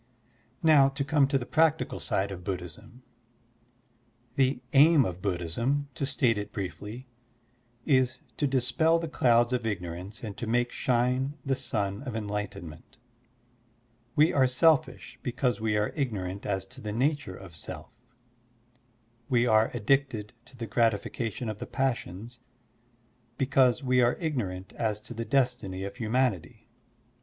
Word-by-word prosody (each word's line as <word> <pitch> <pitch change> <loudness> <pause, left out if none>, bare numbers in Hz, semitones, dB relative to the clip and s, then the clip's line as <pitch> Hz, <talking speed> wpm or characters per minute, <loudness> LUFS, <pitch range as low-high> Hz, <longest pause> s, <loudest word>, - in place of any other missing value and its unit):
Now 150 -4 +6
to 140 +1 -3
come 140 0 +3
to 140 0 +2
the 125 - -4
practical 160 +2 +2
side 100 +1 -1
of 90 -2 -7
Buddhism: 90 +7 -7 1.3
The 135 -2 +2
aim 145 0 +7
of 90 -2 -5
Buddhism, 105 - -1
to 135 - -2
state 115 -6 +2
it 105 0 -6
briefly, 105 +6 -6 0.8
is 130 -2 +2 0.2
to 145 - +1
dispel 140 +5 +2
the 165 0 -3
clouds 120 -4 +3
of 125 -1 0
ignorance 90 +2 -5
and 105 -3 -5
to 120 - -4
make 120 +2 +1
shine 130 +3 0
the 135 - +1
sun 105 -6 -2
of 130 -5 -5
enlightenment. 100 -6 -5 1.2
We 155 +3 +5
are 135 -3 +4
selfish 130 0 +2
because 125 -2 -1
we 110 -1 +1
are 105 0 0
ignorant 100 -9 -3
as 95 -2 -1
to - - -10
the 105 - -4
nature 135 -4 0
of 95 -4 -12
self. 80 - -8 1.4
We 120 -1 +3
are 110 -2 +4
addicted 120 -4 0
to 130 - -16
the 115 - -4
gratification 115 +2 -1
of 110 -1 -4
the - - -6
passions, 120 -3 -3 1.0
because 130 -1 +3
we 125 -1 +3
are 120 0 +3
ignorant 100 - -3
as 110 -3 -1
to 120 - -9
the 115 0 -4
destiny 125 -9 0
of 100 0 -5
htmianity. 115 -3 -1
120 Hz, 140 wpm, -28 LUFS, 105-135 Hz, 1.4 s, aim